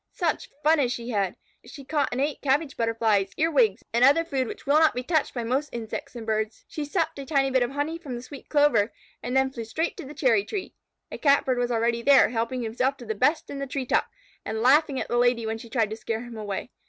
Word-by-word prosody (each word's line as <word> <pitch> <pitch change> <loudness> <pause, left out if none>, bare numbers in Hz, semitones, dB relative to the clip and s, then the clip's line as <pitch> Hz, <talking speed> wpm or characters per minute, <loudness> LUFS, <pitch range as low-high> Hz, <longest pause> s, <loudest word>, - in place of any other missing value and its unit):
Such 340 -4 -1
fun 310 +1 +4
as 250 -4 +1
she 240 0 -4
had! 200 -4 0 0.3
She 260 +4 -11
caught 290 0 0
and 245 - -2
ate 285 +2 -1
Cabbage 280 +1 +1
Butterflies, 220 -4 +1
Earwigs, 270 -11 +2
and 235 +1 +3
other 290 +5 +5
food 265 -6 -1
which - - -8
will 290 +2 +4
not 315 -4 +4
be 250 - -2
touched 315 +2 +1
by 240 - -2
most 265 +5 -1
insects 230 +1 -6
and 230 -2 -7
birds. 220 0 -2
She 300 - -5
supped 320 0 -1
a 275 - -6
tiny 275 -3 +2
bit 260 -1 +3
of 245 - +1
honey 290 +4 -3
from 275 -7 -6
the 240 - -7
sweet 275 +1 -11
clover, 290 -8 +3 0.3
and 250 +2 -1
then 265 0 +2
flew 235 -3 -6
straight 315 +10 -2
to - - -6
the 295 +3 -10
cherry 235 -8 +3
tree. 380 - -5 0.4
A - - -6
Catbird 280 -3 +3
was 245 0 0
already 235 0 +1
there, 275 +2 +6
helping 235 +2 -2
himself 255 +5 -1
to 240 - -10
the 220 - -2
best 295 +9 +1
in 280 - -5
the 275 - -3
tree 265 0 -3
top, - - +1 0.4
and 220 +1 -3
laughing 275 +1 +4
at - - -3
the 240 - 0
Lady 245 -1 +2
when 220 0 -3
she 230 - -11
tried 225 -3 0
to - - -3
scare 225 +1 -4
him 240 -1 -9
away. 210 +2 -5
255 Hz, 250 wpm, -26 LUFS, 230-285 Hz, 0.4 s, there